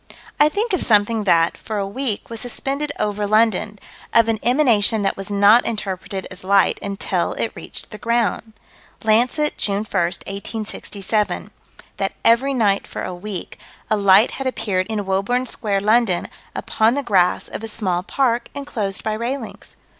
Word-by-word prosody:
I 295 - +6
think 420 +6 -1
of 370 - +1
something 215 0 +3
that, 165 -3 +3
for 215 - -6
a 200 - -1
week, 225 +1 -3
was 230 - -3
suspended 275 +4 -2
over 210 0 -1
London: 215 -1 +2 0.4
of 230 -1 +6
an 220 -1 0
emanation 235 -5 +3
that 195 - 0
was 195 +1 -6
not 205 +4 +5
interpreted 195 -3 -4
as 185 +1 -9
light 195 +1 +3
until 200 -1 -1
it - - -2
reached - - -7
the 210 - -9
ground. 230 -2 -1 0.5
Lancet, 245 +7 +2
June 200 0 0
1, - - -12
1867: 200 +3 -2 0.5
That - - -2
every 260 +4 +4
night 205 -5 +2
for - - -6
a 185 - -4
week, 185 0 -7 0.3
a - - +5
light 200 +2 +5
had 270 - -4
appeared 190 -7 -1
in 215 -2 -3
Woburn 200 +7 0
Square, 205 -5 -1
London, 215 -3 +2 0.3
upon 220 +3 +1
the 285 - -1
grass 185 -6 +2
of - - -7
a - - -4
small 190 -5 -1
park, 240 +3 0
enclosed 215 -9 -3
by 215 - -1
railings. 235 +2 -5
215 Hz, 160 wpm, -20 LUFS, 200-235 Hz, 0.5 s, I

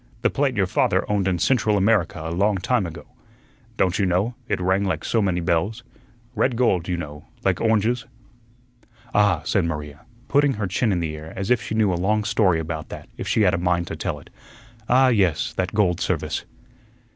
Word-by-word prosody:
"The - - +3
plate 135 -4 0
your 95 - +3
father 90 - +1
owned 100 -2 0
in 90 -2 +1
Central 110 0 +2
America 100 -4 +2
a 80 - -3
long 100 +3 +2
time 100 +1 0
ago. 80 - -9 0.7
Don't 95 +1 +1
you 100 - +2
know, 95 +7 +1
it - - -1
rang 95 +2 +1
like 85 -6 -2
so 115 - +1
many 90 -3 0
bells? 90 +7 -1 0.5
Red 120 +2 +1
gold, 95 -8 +1
you 90 -2 -1
know, 75 -3 -7 0.2
like - - +1
oranges?" 115 +1 +1 1.1
"Ah," 100 -6 +3
said 95 -5 +1
Maria, 75 -2 -5 0.3
putting 145 -1 +3
her 105 -3 -3
chin 105 +5 0
in 90 -3 0
the 80 -2 -3
air 80 +1 -9
as 95 +4 -3
if 120 -2 +3
she 110 - -4
knew 105 -4 +2
a 85 - -2
long 105 +3 +1
story 95 -5 +2
about 80 -1 -5
that - - -9
if - - -6
she 110 - +2
had 90 -2 +4
a 95 - 0
mind 90 -1 +1
to - - -4
tell - - -3
it. - - -15 0.6
"Ah, 130 +1 +5
yes, 95 - +1
that 95 +2 -2
gold 95 -5 +2
service." - - -2
95 Hz, 205 wpm, -23 LUFS, 85-110 Hz, 1.1 s, Ah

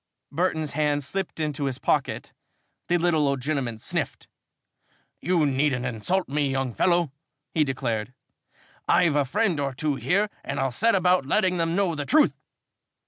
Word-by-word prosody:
Burton's 160 -1 0
hand 145 -1 0
slipped 190 +5 -4
into 150 -2 -2
his 130 -2 -2
pocket. - - -1 0.5
The 175 - +3
little 165 -4 +2
old 140 -1 0
gentleman 130 -4 -2
sniffed. - - -4 0.9
"You 170 -1 +2
needn't 135 -2 +1
insult 135 - -1
me, 145 0 0
young 135 -2 -1
fellow," 175 -2 +2 0.4
he 155 - +3
declared. 125 -5 -2 0.8
"I've 165 -5 +4
a 145 -1 +3
friend 170 - 0
or 140 -2 -2
two 150 0 -1
here 200 +7 +1
and - - -4
I'll 135 - 0
set 230 - +2
about 180 -6 +3
letting 185 +1 +2
them 165 0 0
know 195 -3 +1
the 145 -2 -4
truth." 305 0 +4
150 Hz, 155 wpm, -25 LUFS, 135-175 Hz, 0.9 s, I've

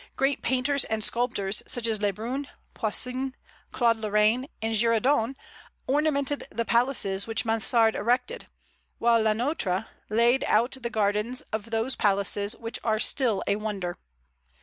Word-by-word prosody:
Great 270 +1 0
painters 260 +3 +1
and 220 -1 -2
sculptors, 215 -5 -1
such 240 -2 +1
as 220 -2 0
Le 205 -1 +2
Brun, 245 +8 -5 0.3
Poussin, 255 +4 -2 0.4
Claude 230 -2 +2
Lorrain, 215 +4 +1
and 225 0 -2
Girardon, 230 +3 +2 0.5
ornamented 285 0 0
the 230 - -2
palaces 230 -5 +1
which 225 +1 -2
Mansard 225 0 +4
erected; 250 - -1 0.5
while 230 -1 +3
Le 220 -1 +2
Nôtre 220 - -1 0.2
laid 235 +4 +3
out 235 +5 +2
the 235 - -3
gardens 215 +3 0
of 220 +1 -3
those 225 +3 -1
palaces 200 +1 +2
which 230 0 -4
are 220 -2 +1
still 235 -3 +1
a 200 - +1
wonder. 200 -5 -4
230 Hz, 140 wpm, -26 LUFS, 215-255 Hz, 0.5 s, Mansard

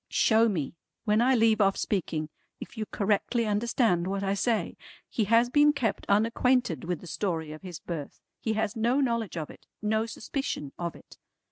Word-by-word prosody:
"Show 225 0 +4
me, 160 -9 -2 0.3
when 210 +1 +3
I 260 +2 +4
leave 225 -2 +4
off 195 -1 +3
speaking, 160 -6 -2 0.3
if - - -9
you 215 -2 -4
correctly 210 +3 0
understand 210 -4 +1
what 195 +1 -2
I 195 0 +1
say. 220 +2 0 0.3
He 220 - -1
has 230 +3 +4
been 295 +1 +5
kept 240 -7 -2
unacquainted 230 -2 +2
with 175 -2 -3
the - - -11
story 160 -2 -2
of 155 - -9
his 180 -4 -7
birth. 160 -5 -6 0.2
He 220 - -1
has 215 -1 -1
no 235 +4 +2
knowledge 230 - 0
of 155 -2 -4
it. - - -17
No 220 +1 0
suspicion 220 - -4
of 170 -1 -3
it. - - -16
210 Hz, 180 wpm, -28 LUFS, 180-230 Hz, 0.3 s, been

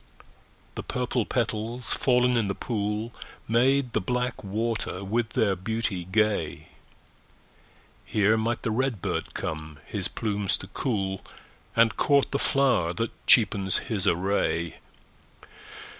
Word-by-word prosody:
The - - -4
purple 125 -2 -1
petals, 115 0 -1
fallen 125 -1 +3
in 115 -4 +2
the 100 - -2
pool, 105 0 -2 0.3
Made 125 +2 +3
the - - +1
black 125 +5 -2
water 105 -1 -2
with 110 +3 -1
their 100 -3 +2
beauty 95 -1 -2
gay; 100 -5 0 1.3
Here 105 +1 +3
might 115 +1 -1
the 115 - 0
red 125 -1 0
bird - - -3
come 80 -1 -4
his - - -3
plumes 105 -3 -1
to - - -9
cool, 95 -2 -2 0.5
And 115 -1 +4
court 140 -2 +3
the 140 - 0
flower 125 -12 +2
that 115 +3 -2 0.2
cheapens 100 -5 +4
his 100 -5 -1
array. 85 -3 +1
110 Hz, 125 wpm, -27 LUFS, 95-120 Hz, 1.3 s, And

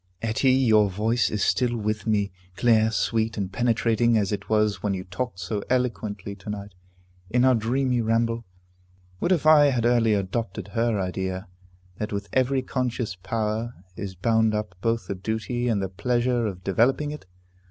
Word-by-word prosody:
Etty, 115 +4 +2
your 110 -6 +4
voice 110 +5 +1
is 105 -3 -1
still 120 -2 +1
with 110 -1 -2
me, 100 -3 +1 0.3
clear, 110 -1 +4
sweet, 110 0 0
and 100 -2 -2
penetrating, 115 0 +2
as 100 -2 0
it 105 -1 -4
was 105 -3 +2
when 100 -2 0
you 90 - -5
talked 95 +3 -4
so 100 +3 -3
eloquently 110 -6 -1
to 100 +2 -10
night, 100 -1 -6 0.6
in 125 +3 +3
our 130 - +6
dreamy 125 +2 +1
ramble. 115 +1 0 0.8
What 175 - 0
if 165 -5 +2
I 155 -2 +7
had 125 -5 +1
early 115 -3 +3
adopted 100 0 -3
her 115 -1 0
idea, 95 +1 -3 0.5
that 105 - -3
with 100 0 -4
every 130 0 +2
conscious 125 -6 -2
power 110 +5 -3 0.2
is 95 -2 -6
bound 110 +3 +2
up 105 -2 -3
both 115 +1 0
the - - -3
duty 110 +5 -2
and 105 -4 +1
the - - -1
pleasure 120 +3 0
of 95 -3 -6
developing 130 +10 +2
it? 150 -10 -9
110 Hz, 170 wpm, -25 LUFS, 100-120 Hz, 0.8 s, I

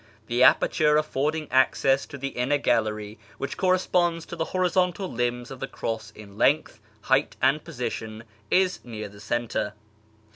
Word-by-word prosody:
The 120 +2 -1
aperture 150 +3 +5
affording 155 +1 -1
access 135 +1 +3
to 140 - -8
the 140 0 -3
inner 135 +3 0
gallery 105 -4 -1 0.2
(which 140 - -4
corresponds 180 -2 +1
to - - -7
the 160 -1 -1
horizontal 185 +1 0
limbs 120 +1 -2
of 135 - -8
the 135 - -4
cross 110 -4 -4
in 100 -1 -13
length, 150 -3 +2 0.2
height, 135 +5 +1
and 140 +3 +2
position) 110 -2 -5 0.3
is 185 -1 +2
near 110 -3 -6
the 100 0 -15
centre. 110 -2 -2
135 Hz, 150 wpm, -26 LUFS, 115-155 Hz, 0.3 s, aperture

